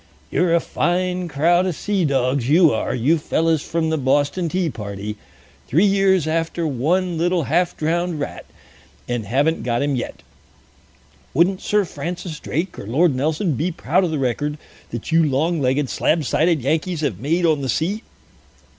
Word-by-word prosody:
"You're 175 -2 +2
a - - +4
fine 180 +2 -1
crowd 170 +5 +2
of 180 - -2
sea 200 -1 0
dogs, 130 -2 0
you 165 -1 +5
are, 110 - -1
you 150 +8 +2
fellows 160 0 +1
from 160 0 -1
the 160 - 0
Boston 145 +6 +1
Tea 180 +1 0
Party. 105 -5 -5 0.5
Three 165 +10 +3
years 195 -4 +3
after 165 +1 -1
one 165 +6 0
little 175 0 +1
half 170 +6 0
drowned 170 +1 -1
rat, 145 - -5 0.6
and 120 -4 -3
haven't 140 +8 +1
got 120 +2 0
him 145 -1 0
yet. 120 - -5 1.1
Wouldn't 185 +5 +3
Sir 210 -1 +1
Francis 170 -2 -6
Drake 170 +5 -3
or - - -8
Lord 150 +7 +3
Nelson 155 +6 0
be 160 +8 -1
proud 170 +4 +1
of 180 - 0
the 155 - -2
record 145 +3 -1 0.3
that 120 +6 -6
you 165 0 +5
long 155 +3 +1
legged, 135 +2 +1
slab 155 +4 0
sided 160 +2 +2
Yankees 160 +4 0
have 130 - -2
made 165 +8 +1
on 155 -3 +2
the 135 - -3
sea!" 185 - -1
160 Hz, 170 wpm, -21 LUFS, 140-175 Hz, 1.1 s, you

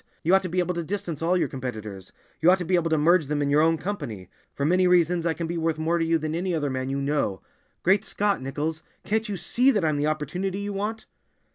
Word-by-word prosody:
You 175 +3 +3
ought 190 - +6
to 185 - -4
be 180 - -4
able 180 0 +1
to 170 -1 -3
distance 175 -3 -4
all 175 +3 +2
your - - +1
competitors; 110 -8 -7 0.3
you 165 - +5
ought 185 - +6
to 180 - -4
be 185 - -2
able 170 -2 +2
to 160 - +2
merge 165 +1 +3
them 150 0 -1
in 140 -1 0
your 150 +1 +5
own 165 +1 +3
company. 145 - -5 0.2
For 140 - -1
many 180 +3 +3
reasons 175 -1 +3
I 165 - 0
can 170 - -3
be 170 +1 -3
worth 160 -1 0
more 165 +2 0
to - - +1
you 165 0 +2
than 155 0 -3
any 175 +1 -1
other 145 -3 -1
man 130 0 -3
you 135 +1 -1
know. 140 -9 -1 0.4
Great 195 +3 +3
Scott, 205 -4 0
Nichols, 150 +4 -3 0.2
can't 220 +1 -1
you 200 - -3
see 250 +8 +2
that 205 -10 +2
I'm 155 -2 +1
the 145 +1 0
opportunity 175 +6 -2
you 205 0 -4
want?" 210 +3 -3
165 Hz, 260 wpm, -25 LUFS, 150-185 Hz, 0.4 s, ought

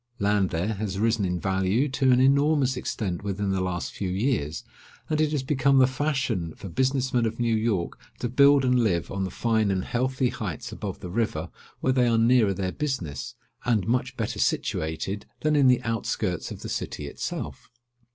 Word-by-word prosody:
Land 100 -2 +2
there, 90 +6 -1
has 100 -2 -3
risen 110 -1 +1
in 90 -1 -1
value 95 +7 +1
to 130 0 +2
an 125 - +5
enormous 140 0 +3
extent 105 -7 -3
within 100 0 -2
the 95 -1 0
last 90 -1 -3
few 95 - -3
years; 95 - -1 0.5
and 155 0 +2
it 155 -1 +2
has 145 -4 -1
become 135 0 +2
the 130 - +7
fashion 130 - -1
for 95 - -8
business 130 +4 0
men 120 -2 +3
of 110 +1 -5
New 115 -2 +2
York 110 -6 -1 0.2
to 120 - -2
build 140 +2 +5
and 125 0 +3
live 85 -6 0
on 95 0 -1
the - - -3
fine 110 0 +1
and 95 -1 0
healthy 130 +1 0
heights 95 -10 -5
above - - -6
the 90 - -6
river, 115 +2 -1 0.3
where 130 - +2
they 125 -2 +3
are 115 -1 +3
nearer 115 -3 +4
their 95 -1 -2
business, 110 - -4 0.3
and 110 -6 +1
much 125 +2 0
better - - -3
situated 90 +6 -1
than 155 0 +2
in 140 -2 +5
the 125 -1 +4
outskirts 110 -5 -2
of - - -8
the - - -5
city - - -4
itself. - - -5
115 Hz, 190 wpm, -26 LUFS, 95-130 Hz, 0.5 s, the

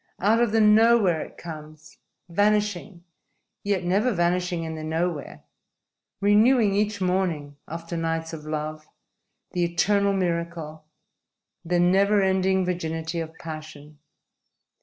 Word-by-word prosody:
Out 220 +5 +3
of 235 -3 +2
the 225 - +2
nowhere 210 -5 +5
it - - -9
comes, 155 -2 -11 0.3
vanishing, 205 -1 0 0.6
yet 200 -3 0
never 200 +8 +1
vanishing 175 -2 0
in 160 0 -5
the 155 -1 -6
nowhere; 160 -1 -3 0.8
renewing 210 +2 +4
each 205 0 0
morning, 175 -6 -1
after 165 +1 -6
nights 165 0 -2
of 155 -2 -7
love, 155 0 -5 0.6
the 175 - 0
eternal 200 +4 +2
miracle, 170 -4 -3 0.8
the 175 +1 0
never 195 +4 +4
ending 190 -1 +2
virginity 165 -2 -3
of 160 -1 -5
passion. 155 -2 -10
175 Hz, 115 wpm, -25 LUFS, 160-200 Hz, 0.8 s, nowhere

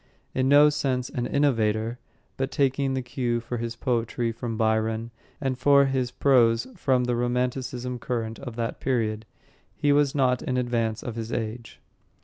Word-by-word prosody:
In 130 0 +1
no 145 +1 +7
sense 130 -4 -1
an 120 -1 -2
innovator, 115 -4 +1 0.4
but 135 0 -2
taking 135 -1 +1
the 130 - -2
cue 125 -1 -1
for 120 +1 -5
his 115 0 -4
poetry 120 -1 -1
from 115 0 -5
Byron 110 +1 0 0.3
and 135 -2 -2
for 140 +1 +5
his 130 -2 0
prose 120 -4 +3
from 130 -8 +1
the 125 0 0
romanticism 125 0 -2
current 115 -2 -3
at 125 -4 -7
that 115 -1 -3
period, 110 -4 -1 0.5
he 145 - +2
was 145 -1 +2
not 125 -3 +2
in 125 - -2
advance 115 -3 -1
of 120 - -5
his 115 0 -4
age. 115 +1 -5
125 Hz, 160 wpm, -26 LUFS, 115-130 Hz, 0.5 s, no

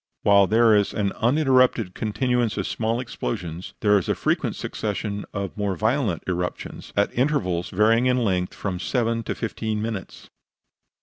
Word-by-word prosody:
While 100 -1 +5
there 110 +1 +5
is 100 -1 +1
an 100 -2 0
uninterrupted 130 -6 +2
continuance 120 0 0
of 100 - -1
small 115 +1 -1
explosions, 85 - -5
there 105 -1 +4
is 90 - -6
a - - +2
frequent - - 0
succession 105 -1 -4
of 100 -2 -4
more 100 -2 -1
violent 110 - 0
eruptions, 90 -1 -4
at 100 - +2
intervals 105 - 0
varying 115 +5 +3
in 125 0 +3
length 95 -7 0
from 95 -3 -3
seven 115 +3 0
to - - -4
fifteen 110 -1 -3
minutes. 110 -4 -6
105 Hz, 150 wpm, -24 LUFS, 95-115 Hz, -, While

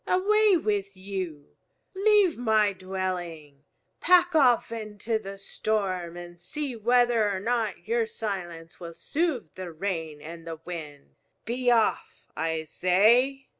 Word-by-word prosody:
Away 415 +1 +4
with 200 - -2
you! 185 -6 -6 0.4
Leave 400 -3 +4
my 215 -4 +2
dwelling! 175 -6 -5 0.3
Pack 355 0 +5
off 255 -7 +4
into 220 0 -3
the 195 -2 -8
storm 190 -4 -2
and 175 0 -10
see 280 - -4
whether 235 -1 +3
or 190 - -2
not 225 -2 -2
your 460 0 +1
silence 180 - -6
will 170 -2 -8
soothe 315 - -2
the 185 -2 -7
rain 160 -3 -4
and 165 +2 -10
the 165 -1 -6
wind. 150 -5 -8 0.3
Be 245 +2 0
off, 220 - +1
I 160 0 -1
say!" 230 - +3
200 Hz, 130 wpm, -27 LUFS, 175-245 Hz, 0.4 s, Pack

